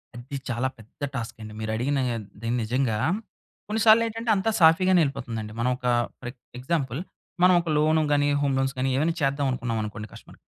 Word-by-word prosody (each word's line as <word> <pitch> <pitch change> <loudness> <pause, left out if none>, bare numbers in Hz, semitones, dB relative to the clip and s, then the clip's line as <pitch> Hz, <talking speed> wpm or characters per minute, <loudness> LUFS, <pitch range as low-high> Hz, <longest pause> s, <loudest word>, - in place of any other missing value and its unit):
అది 130 +4 -6
చాలా 120 +2 0
పెద్ద 115 +5 -13
టాస్క్ 115 -3 -4
అండి 110 0 -8
మీరు 110 0 -3
అడిగినాగానిది 115 -4 -2
నిజంగా. 120 -1 0 0.7
కొన్ని 215 +1 -1
సార్లు 225 +1 +7
ఏంటంటే, 225 +1 -5
అంతా 220 +3 +1
సాఫీగానే 180 +3 +6
వెళ్ళిపోతుందండి. 115 -7 -3
మనం 125 +2 +1
ఒక 125 - -11 0.3
ఫర్ 120 - -6
ఏక్ 130 - -26 0.2
ఎగ్జాంపుల్ 135 -2 -1 0.4
మనం 180 0 +7
ఒక 170 - -6
లోను 155 +1 +3
గాని, 145 0 +3
హోమ్ 140 -2 +1
లోన్స్ 135 -1 0
గాని, 135 - +1
ఏవైనా 160 +4 +1
చేద్దాం 140 +1 +1
అనుకున్నాం 120 -2 -2
అనుకోండి 105 0 -6
కస్టమర్‌కి. - - -15
135 Hz, 175 wpm, -25 LUFS, 115-160 Hz, 0.7 s, సార్లు